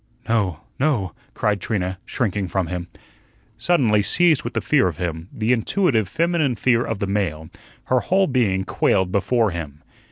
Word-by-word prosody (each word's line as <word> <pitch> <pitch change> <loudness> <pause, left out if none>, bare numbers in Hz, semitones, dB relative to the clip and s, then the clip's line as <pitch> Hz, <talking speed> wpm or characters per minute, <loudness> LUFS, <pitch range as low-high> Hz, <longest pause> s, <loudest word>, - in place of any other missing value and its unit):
"No, 100 -8 0 0.2
no," 130 - 0 0.2
cried 105 -2 0
Trina, 95 -4 -2
shrinking 100 -5 -1
from 95 +1 -1
him. 90 +1 -5 0.7
Suddenly 120 -12 +3
seized 160 - +3
with - - -6
the - - +2
fear 140 -9 +3
of 85 - -4
him 85 -1 -4
the 110 +2 -1
intuitive 120 - +1
feminine 165 - +1
fear 115 +2 +2
of 110 - -3
the 100 - -2
male 90 -6 -2 0.3
her 130 - +2
whole 190 +8 +2
being 115 - +1
quailed 95 -1 +1
before 110 +2 +1
him. 75 -4 -7
105 Hz, 160 wpm, -22 LUFS, 90-130 Hz, 0.7 s, Suddenly